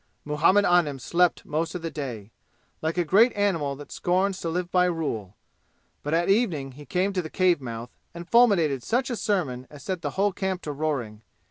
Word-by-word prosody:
Muhammad 165 +7 +3
Anim 170 -6 +3
slept 170 +7 +1
most 165 +4 -2
of 175 - -5
the 165 - -3
day, 120 -9 -6 0.5
like 160 +2 -2
a 175 - +3
great 215 +10 +5
animal 170 -9 0
that 145 +1 -11
scorns 185 +2 0
to 165 - -2
live 175 +1 -2
by 180 -1 +4
rule. 140 - -3 0.7
But 150 +2 -1
at 170 +1 +1
evening 185 - +1
he 145 +2 -13
came 185 +5 0
to 185 - 0
the 155 - -7
cave 180 -4 +2
mouth 120 -1 -6 0.2
and 170 0 -9
fulminated 185 - +4
such 250 - 0
a - - -1
sermon 140 - -1
as 145 -1 -12
set 185 -1 -3
the - - -2
whole 200 0 +2
camp 190 -1 -3
to 150 - -4
roaring. 135 -8 -3
165 Hz, 200 wpm, -26 LUFS, 145-185 Hz, 0.7 s, great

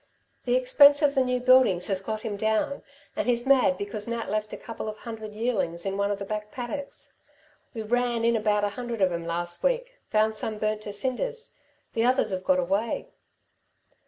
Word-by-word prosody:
The - - +2
expense 305 -13 +6
of 285 -1 +4
the 265 - +3
new 250 0 0
buildings 250 -8 +4
has 190 -2 +2
got 215 +2 -4
him 215 -2 -4
down, 220 +6 0 0.3
and - - -2
he's 240 0 +1
mad 260 -9 +4
because 205 +2 -2
Nat 230 -3 -3
left 215 0 -2
a - - -5
couple 225 -1 -6
of 215 - -7
hundred 220 -2 -8
yearlings 205 -7 -1
in 195 0 -2
one 200 0 0
of 205 - -1
the 200 - -6
back 210 +1 -5
paddocks. 275 +3 -5 0.6
We 220 - -3
ran 240 +1 0
in 235 0 +3
about 210 -1 +1
a 205 - +2
hundred 235 -1 -3
of 185 - +3
'em 170 -1 -4
last 175 +1 -2
week - - -1
found 215 0 +2
some 215 0 -3
burnt 215 0 -1
to 210 - -6
cinders 265 - -1 0.4
the 225 - +1
others 245 -4 +2
've 185 0 -3
got 185 0 +3
away." 195 +6 -1
220 Hz, 200 wpm, -26 LUFS, 205-250 Hz, 0.6 s, expense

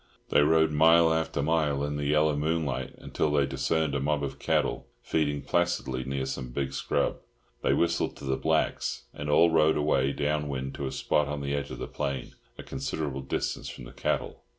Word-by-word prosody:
They - - +5
rode 80 +1 +4
mile 80 +2 +5
after 80 -3 -1
mile 75 -3 +1
in 75 0 -2
the 75 0 -2
yellow 75 0 +3
moonlight, 75 -4 -1
until 75 - -1
they 70 -1 +3
discerned 70 +3 0
a 70 - 0
mob 75 +1 0
of 70 0 -4
cattle - - 0 0.2
feeding 75 -2 0
placidly 85 -7 0
near 65 0 -2
some 65 -1 -4
big 65 +2 -3
scrub. - - 0 0.4
They - - +2
whistled 85 0 +1
to 70 - -9
the 65 0 +1
blacks, - - 0
and 75 0 -5
all 85 +3 +5
rode 80 -1 +4
away 70 -2 +2
down 75 +1 -1
wind 65 -1 -3
to 70 - -4
a - - -4
spot 75 -1 +1
on 75 0 -3
the 70 0 -2
edge 70 0 -2
of - - -6
the - - -4
plain, 70 -2 -4 0.2
a - - -8
considerable 70 +1 -3
distance 65 - -3
from - - -9
the - - -10
cattle. - - -2
75 Hz, 195 wpm, -28 LUFS, 70-80 Hz, 0.4 s, They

